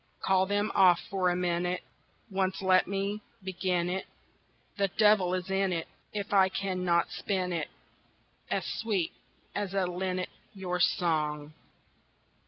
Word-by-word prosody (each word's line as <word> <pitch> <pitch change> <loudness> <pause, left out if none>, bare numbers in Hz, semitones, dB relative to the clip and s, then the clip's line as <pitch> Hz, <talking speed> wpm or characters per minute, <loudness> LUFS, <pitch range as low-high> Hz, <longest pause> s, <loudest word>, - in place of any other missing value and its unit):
Call 190 0 +3
them 205 +1 +1
off 180 -3 +6
for 185 -2 +2
a 175 - +1
minute, 180 0 0 0.5
Once 190 0 0
let 185 -1 +4
me 200 +2 -2 0.2
begin 180 -2 0
it 190 +1 -2 0.7
The 200 -1 +2
devil 195 -2 +4
is 185 +1 -4
in 195 0 +2
it 165 -2 -2 0.2
If 205 -1 -4
I 190 -1 +6
can 185 -1 -2
not 170 -1 +2
spin 185 -3 -1
it 160 -3 -1 0.8
As - - -1
sweet 205 -7 -1 0.4
as 200 -1 -3
a 195 -1 +2
linnet, 185 +1 -2 0.3
your 180 -2 -2
song! 155 -4 +1
185 Hz, 140 wpm, -30 LUFS, 180-195 Hz, 0.8 s, off